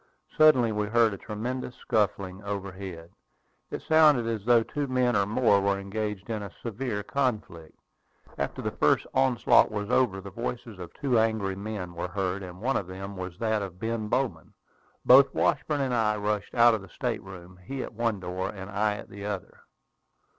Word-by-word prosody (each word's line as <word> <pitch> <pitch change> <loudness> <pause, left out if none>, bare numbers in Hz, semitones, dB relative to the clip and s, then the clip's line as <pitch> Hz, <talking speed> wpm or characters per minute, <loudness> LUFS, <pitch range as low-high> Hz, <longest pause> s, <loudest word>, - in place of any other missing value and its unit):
Suddenly 140 -7 +5
we 105 -1 -1
heard 115 0 +3
a - - -6
tremendous 125 +4 -5
scuffling 100 -3 -1
overhead. 95 -4 -6 0.6
It - - -6
sounded 155 -6 +5
as 110 -3 -3
though 120 -1 +5
two 145 +4 -3
men 125 -2 +1
or 100 -1 +2
more 105 -2 +3
were 100 0 +1
engaged 105 0 -4
in 110 -2 -3
a 100 - -6
severe 115 -2 -3
conflict. 105 - -3 0.6
After - - -3
the - - -1
first - - +2
onslaught 130 -3 +4
was 105 -1 -4
over, 110 -7 +2
the 100 0 -9
voices 115 -1 -5
of 90 - -8
two 130 -5 +1
angry 110 -4 0
men 100 -3 -5
were 85 +1 -4
heard; 95 +1 -2
and 90 -1 -9
one 135 +4 +1
of 95 - -4
them 95 +2 -7
was 90 -2 -6
that 110 -1 0
of 95 -3 -6
Ben 115 0 -2
Bowman. 115 -9 -2 0.5
Both 135 +2 +7
Washburn 150 -2 +1
and 130 -2 0
I 110 -2 +2
rushed 105 0 -2
out 120 -1 +6
of 110 - -1
the 95 - -13
state 120 -4 -3
room, 90 -1 -12
he 135 +5 -4
at - - -8
one 115 -2 -1
door, 95 +1 -3
and 100 -1 -8
I 105 +1 +1
at - - -9
the 100 0 -9
other. 100 -3 -5
105 Hz, 185 wpm, -27 LUFS, 95-120 Hz, 0.6 s, Both